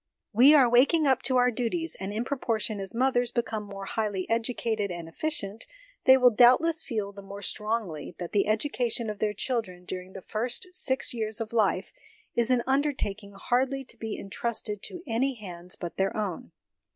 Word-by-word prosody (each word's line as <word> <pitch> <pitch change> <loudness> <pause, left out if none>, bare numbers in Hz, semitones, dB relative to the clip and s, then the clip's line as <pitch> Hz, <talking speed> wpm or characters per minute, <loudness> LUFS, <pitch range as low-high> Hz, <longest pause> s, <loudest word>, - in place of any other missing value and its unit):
We 265 +8 +8
are 270 -4 +7
waking 275 +7 +4
up 265 -2 +3
to 255 +1 +1
pur 250 0 +4
duties, 255 +9 -2
and 195 +1 -4
in 220 +3 -2
propor 250 -5 -1
tion 215 -1 -1
as 195 +2 -2
mothers 245 -1 +2
become 225 -3 -2
more 200 -1 -8
highly 205 -3 -2
educated 225 -2 0
and 170 -2 -6
efficient, 215 - -4 0.4
they 260 0 +8
will 250 -1 +6
doubtless 255 +9 +5
feel 210 -4 -3
the 200 0 -11
more 200 +1 -9
strongly 210 -8 -3
that 175 -1 -6
the 205 -1 +2
education 230 0 0
of 210 - -9
their 210 -1 0
children 195 -8 -2
during 185 +1 -6
the 190 - -9
first 240 - -2
six 265 -9 0
years 220 -1 -2
of 225 0 -5
life 210 -4 +1 0.4
is 235 0 +2
an 250 -2 +3
undertaking 260 -8 -1
hardly 260 +6 0
to 245 - -6
be 220 -1 -4
entrusted 210 0 -3
to 355 -2 -6
any 260 +2 0
hands 180 -5 -7
but 175 -2 -7
their 195 +2 0
own. 190 - -4
225 Hz, 185 wpm, -28 LUFS, 200-250 Hz, 0.4 s, We